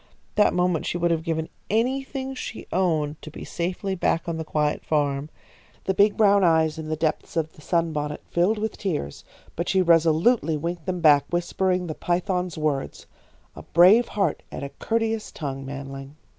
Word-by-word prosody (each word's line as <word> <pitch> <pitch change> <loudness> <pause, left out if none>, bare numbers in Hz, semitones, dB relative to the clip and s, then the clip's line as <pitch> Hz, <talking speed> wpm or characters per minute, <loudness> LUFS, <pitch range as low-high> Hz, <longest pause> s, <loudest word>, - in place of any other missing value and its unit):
That 210 - +3
moment 180 -3 +1
she - - -1
would 175 0 +1
have 165 -1 +1
given 160 -1 -2 0.2
anything 265 +4 -1
she 255 - -7
owned 160 -5 0
to - - -9
be - - -9
safely 180 +3 -3
back 170 -2 0
on 165 -1 -2
the 160 - -3
quiet 150 -1 -1
farm. 145 -1 0 0.5
The 190 - 0
big 205 +2 +3
brown 200 -2 +5
eyes 160 -2 +3
in 155 - -6
the 155 - -1
depths 155 +1 -2
of 160 -1 -1
the - - -17
sunbonnet 155 -3 -1
filled 180 +6 +2
with 220 +1 -3
tears, 155 - -3 0.3
but 170 - -2
she 190 -1 +3
resolutely 165 +2 +3
winked 170 +2 -4
them 180 -1 -2
back, 145 -3 +6
whispering 180 +1 0
the 160 - -4
python's 180 +1 -1
words: 150 -3 -2 0.5
"A - - -9
brave 190 +8 +5
heart 195 -7 -1
and - - -6
a 140 - -4
courteous 225 +4 -2
tongue, 135 -3 -5
manling." 135 0 -7
170 Hz, 175 wpm, -24 LUFS, 155-190 Hz, 0.5 s, back